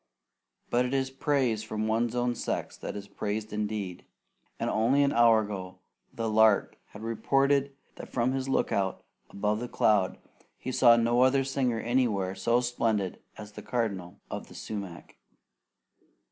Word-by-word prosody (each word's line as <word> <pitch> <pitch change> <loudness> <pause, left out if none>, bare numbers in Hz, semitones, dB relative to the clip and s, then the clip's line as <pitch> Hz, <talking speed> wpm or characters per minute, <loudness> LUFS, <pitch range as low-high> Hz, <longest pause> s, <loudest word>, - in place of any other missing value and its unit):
But 120 +1 +3
it 125 +2 -1
is 135 -1 0
praise 135 -5 0
from 110 0 -3
one's 115 +2 0
own 120 0 +1
sex - - -3
that - - -6
is 100 -1 -7
praise 105 +1 -4
indeed, 105 -3 -3 0.6
and - - -1
only 125 +6 +3
an 140 - +2
hour 115 -2 +5
ago 95 -3 -6 0.3
the 115 -1 -3
lark 110 -1 +3
had 105 - -11
reported 135 +4 +1 0.2
that - - -9
from 125 0 +1
his 135 0 -2
lookout 100 -7 0 0.3
above 105 +4 -2
cloud 100 -4 +2 0.4
he 130 - -5
saw 120 -1 +6
no 120 +1 +2
other 135 +1 +4
singer 130 -3 0
anywhere 115 -7 0
so 120 +4 +1
splendid 115 -5 -1 0.2
as 105 -1 -9
the - - -9
Cardinal 100 -6 -3
of - - -5
the - - -14
sumac. 100 -6 -7
115 Hz, 150 wpm, -28 LUFS, 105-125 Hz, 0.6 s, saw